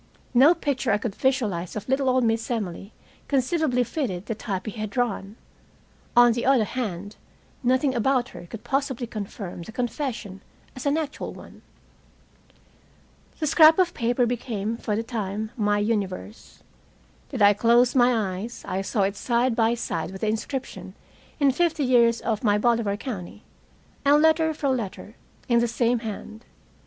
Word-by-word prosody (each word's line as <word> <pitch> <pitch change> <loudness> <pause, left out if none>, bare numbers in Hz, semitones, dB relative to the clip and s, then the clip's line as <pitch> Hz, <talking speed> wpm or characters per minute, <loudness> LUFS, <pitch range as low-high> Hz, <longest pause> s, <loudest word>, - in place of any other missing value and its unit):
No 280 +8 +6
picture 275 -6 -1
I 200 - +3
could 210 -1 -4
visualize 215 -10 -1
of 210 - -5
little 265 0 +1
old 255 0 +2
Miss 225 0 0
Emily 200 -4 -4 0.4
conceivably 270 -1 +1
fitted 215 - -3
the 225 - -2
type 200 -3 -4
he 215 - -4
had 215 0 -5
drawn. 210 -3 -2 0.8
On 240 0 +8
the 235 +1 -2
other 265 -3 +4
hand, 205 -4 -4 0.4
nothing 260 +2 +2
about 255 +1 +1
her 175 - -11
could 220 +4 -9
possibly 270 -3 -1
confirm 200 -5 -7
the 170 - -9
confession 235 -5 -4 0.3
as 255 +2 -4
an 285 +2 +2
actual 305 -2 -4
one. - - -13 1.8
The 315 - 0
scrap 315 +1 +7
of 360 -2 +2
paper 240 +1 +1
became, 230 -3 -2
for 215 -2 -3
the 225 - -1
time, 215 -2 -4
my 210 -2 +1
universe. 205 -1 -3 0.7
Did 250 -7 0
I 205 0 +7
close 235 +3 +4
my 230 -7 +2
eyes, 230 +4 -7
I 190 - -1
saw 200 +1 0
it 195 +1 0
side 240 +3 +1
by 225 0 +2
side 165 -8 -3
with 190 0 -9
the 215 - +1
inscription 255 +5 -4 0.4
in 280 -2 +4
"Fifty 320 +1 +1
years 235 -2 +4
of 220 -1 -2
my 205 -2 +3
Bolivar 225 -2 +1
County," 210 -4 -7 0.6
and 290 +1 +5
letter 320 +1 +4
for 285 -2 -1
letter, 220 -4 -3 0.3
in 235 -1 +4
the 235 - +2
same 235 +1 +1
hand. 220 0 -7
235 Hz, 160 wpm, -25 LUFS, 210-260 Hz, 1.8 s, On